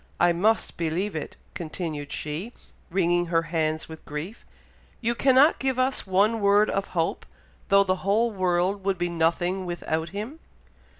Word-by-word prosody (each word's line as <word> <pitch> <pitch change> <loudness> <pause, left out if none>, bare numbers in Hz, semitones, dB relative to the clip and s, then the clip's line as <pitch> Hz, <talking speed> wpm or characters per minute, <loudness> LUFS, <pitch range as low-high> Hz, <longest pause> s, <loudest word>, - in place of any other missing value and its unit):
I 175 0 +4
must 215 +6 +1
believe 170 +4 -1
it!" 155 - -5 0.2
continued 155 -3 -5
she, 160 +11 -4 0.4
wringing 175 -1 +1
her 165 -1 +2
hands 155 -1 -1
with 160 -1 -10
grief. 155 +9 -7 0.5
"You 235 0 0
cannot 265 +5 +4
give 265 -1 0
us 255 -3 0
one 205 +4 +2
word 205 +1 +4
of 195 0 -1
hope, 165 0 0 0.4
though 200 0 +5
the 185 -1 0
whole 215 +5 +1
world 185 0 0
would 195 -1 0
be 175 0 -1
nothing 170 +3 0
without 160 -2 -2
him." 215 - -6
185 Hz, 155 wpm, -26 LUFS, 165-210 Hz, 0.5 s, though